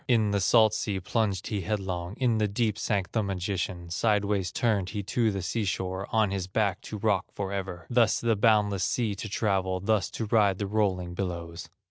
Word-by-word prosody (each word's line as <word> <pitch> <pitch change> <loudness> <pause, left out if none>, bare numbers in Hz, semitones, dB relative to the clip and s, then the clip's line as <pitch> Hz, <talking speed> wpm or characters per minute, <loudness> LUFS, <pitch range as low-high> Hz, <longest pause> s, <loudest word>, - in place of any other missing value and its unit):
In 110 -4 +3
the 100 -1 +1
salt 110 +2 +5
sea 105 -3 -2
plunged 100 -1 -1
he 105 -4 -2
headlong, 95 -2 -3
In 120 -4 +2
the 105 - +2
deep 105 +1 0
sank 100 -5 -1
the 110 - +1
magician, 90 -3 -3
Sidewise 100 -2 +1
turned 105 -5 0
he 105 -1 -4
to 115 +3 +1
the 100 -3 -3
sea 110 +4 -1
shore, 95 0 -2
On 110 -3 +2
his 95 -2 -2
back 100 -1 0
to 105 - -4
rock 105 -2 +1
forever, 95 -3 -4
Thus 120 -2 +3
the 115 -1 +1
boundless 105 -2 +3
sea 115 -4 0
to 105 +2 -6
travel, 95 -3 0
Thus 100 0 +1
to 115 - -2
ride 105 -3 +3
the 100 - -2
rolling 95 -4 0
billows." 85 -2 -5
100 Hz, 190 wpm, -28 LUFS, 95-110 Hz, -, salt